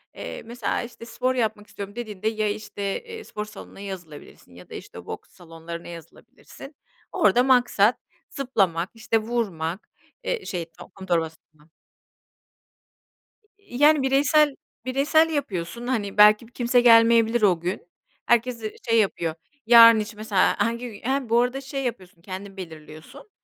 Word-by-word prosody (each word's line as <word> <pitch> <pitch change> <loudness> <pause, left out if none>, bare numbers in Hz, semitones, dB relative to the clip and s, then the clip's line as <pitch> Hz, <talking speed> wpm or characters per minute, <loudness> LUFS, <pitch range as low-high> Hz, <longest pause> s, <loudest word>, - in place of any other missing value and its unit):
Eee, - - -7
mesela 240 -1 -3
işte, 235 -1 -10
"Spor 255 +2 -1
yapmak 215 -3 -2
istiyorum," 200 +1 -8
dediğinde 215 -4 -5
ya 215 -1 0
işte, 210 0 -6 0.2
eee, 455 -1 -9
spor 210 0 -6
salonuna 210 -2 -12
yazılabilirsin 175 - -10
ya 90 - -15
da - - -11
işte - - -10
boks - - -8
salonlarına 170 0 -10
yazılabilirsin. 175 - -13 0.4
Orada 245 +1 +3
maksat 245 -4 +3 0.3
zıplamak, 195 - 0
işte 225 0 0
vurmak, 210 -6 -3 0.3
eee, - - -3
şey, 175 -3 -4 0.3
kum 195 - -10
torbasına. 160 -2 -4 1.9
Yani 295 -3 +3
bireysel 280 +2 +3 0.3
bireysel 295 +5 +3
yapıyorsun. 235 - -4
Hani 210 -6 -2
belki 210 +2 +6
bir 240 - -23
kimse 245 0 +2
gelmeyebilir 230 0 +5
o 185 -5 +3
gün. 175 +1 -4 0.4
Herkes 240 +1 +2
z - - -17 0.3
şey 230 0 +4
yapıyor, 170 -6 -1 0.3
yarın 230 -1 +9
için 210 0 -6
mesela 210 -3 +1
hangi 235 +1 -1
gün 205 - -12
he, 270 -3 -1
bu 235 +1 +4
arada 250 +2 -1
şey 275 0 -5
yapıyorsun, 185 -8 -6
kendin 195 +1 -8
belirliyorsun, 160 - -11
220 Hz, 140 wpm, -24 LUFS, 185-245 Hz, 1.9 s, yarın